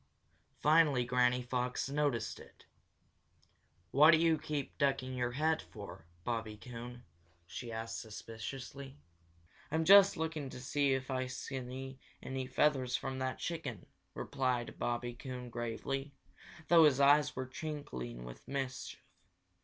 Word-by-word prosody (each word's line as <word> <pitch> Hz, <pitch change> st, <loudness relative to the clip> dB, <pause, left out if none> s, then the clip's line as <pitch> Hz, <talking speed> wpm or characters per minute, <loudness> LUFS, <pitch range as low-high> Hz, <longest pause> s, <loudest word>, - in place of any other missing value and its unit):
Finally 150 Hz, -5 st, +5 dB
Granny 125 Hz, 0 st, +2 dB
Fox 125 Hz, +1 st, -1 dB
noticed 140 Hz, -4 st, -1 dB
it. -, -, -16 dB, 1.3 s
"What 150 Hz, +3 st, +7 dB
do 165 Hz, -, +8 dB
you 165 Hz, -1 st, +3 dB
keep 145 Hz, -3 st, -4 dB
ducking 135 Hz, -2 st, +1 dB
your 125 Hz, -1 st, -1 dB
head 155 Hz, +4 st, +1 dB
for, 95 Hz, -5 st, -10 dB, 0.2 s
Bobby 115 Hz, -1 st, -3 dB
Coon?" 120 Hz, +1 st, -8 dB, 0.4 s
she 115 Hz, +7 st, -7 dB
asked 115 Hz, 0 st, -4 dB
suspiciously. 125 Hz, +5 st, -7 dB, 0.7 s
"I'm 160 Hz, +2 st, 0 dB
just 200 Hz, 0 st, +8 dB
looking 160 Hz, -3 st, -3 dB
to 125 Hz, -, -8 dB
see 140 Hz, +1 st, +1 dB
if 130 Hz, +1 st, -4 dB
I 130 Hz, 0 st, -1 dB
can -, -, -9 dB
see 130 Hz, 0 st, -6 dB, 0.2 s
any 130 Hz, -1 st, -3 dB
feathers 130 Hz, -2 st, +2 dB
from 135 Hz, 0 st, -3 dB
that 130 Hz, 0 st, -2 dB
chicken," 145 Hz, -, -4 dB, 0.3 s
replied 130 Hz, -3 st, -2 dB
Bobby 120 Hz, 0 st, -1 dB
Coon 125 Hz, 0 st, -7 dB
gravely, 135 Hz, +4 st, -3 dB, 0.5 s
though 165 Hz, -2 st, +8 dB
his 140 Hz, -3 st, +4 dB
eyes 145 Hz, +1 st, +5 dB
were 130 Hz, -, -3 dB
twinkling 65 Hz, -, -6 dB
with -, -, -11 dB
mischief. 135 Hz, -1 st, -4 dB
130 Hz, 130 wpm, -34 LUFS, 120-145 Hz, 1.3 s, do